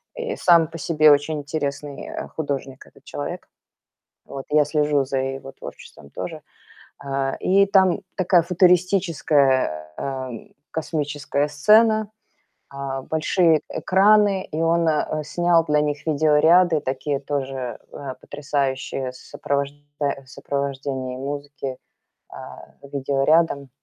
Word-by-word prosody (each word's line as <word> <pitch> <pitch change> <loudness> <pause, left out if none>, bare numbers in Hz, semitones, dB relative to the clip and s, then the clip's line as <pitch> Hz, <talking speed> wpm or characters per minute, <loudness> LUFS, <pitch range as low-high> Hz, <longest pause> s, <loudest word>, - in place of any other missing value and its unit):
И 480 -1 -4
сам 170 -3 +5
по 165 - -9
себе 155 -1 +4
очень 145 +1 +2
интересный, 145 -1 -4
э, - - -6
художник 140 -3 -5
этот - - -21
человек. 70 0 -6 0.8
Вот 135 -1 -8
я 150 -1 +4
слежу 150 -2 +1
за 135 0 -2
его 135 0 -4
творчеством 70 - -12
тоже. - - -6 0.6
Э, 135 -1 -2
и 195 +2 +4
там 190 -3 +3 0.2
такая 180 -2 +3
футуристическая, 165 - +2
эм, 130 -4 -6 0.2
космическая 145 -2 -2
сцена, 215 +8 +4 0.6
а, 135 -1 -5
большие 160 +2 +2
экраны. 200 0 +3
И 155 - -3
он, 165 0 +2
э, 155 0 0
снял 175 +1 +2
для 150 -1 +2
них 150 +1 -2
видеоряды 155 +2 +4
такие 135 +1 -3
тоже, 135 -3 -4
э, 135 -2 -7
потрясающие 135 -3 -3
с 130 - -14
сопровожда 140 0 -3 0.2
в 140 -2 -2
сопровождении 135 -1 -4
музыки, 140 -1 -5 0.5
а, - - -11 0.2
видеорядом. 140 +1 +1
145 Hz, 115 wpm, -22 LUFS, 135-165 Hz, 0.8 s, сам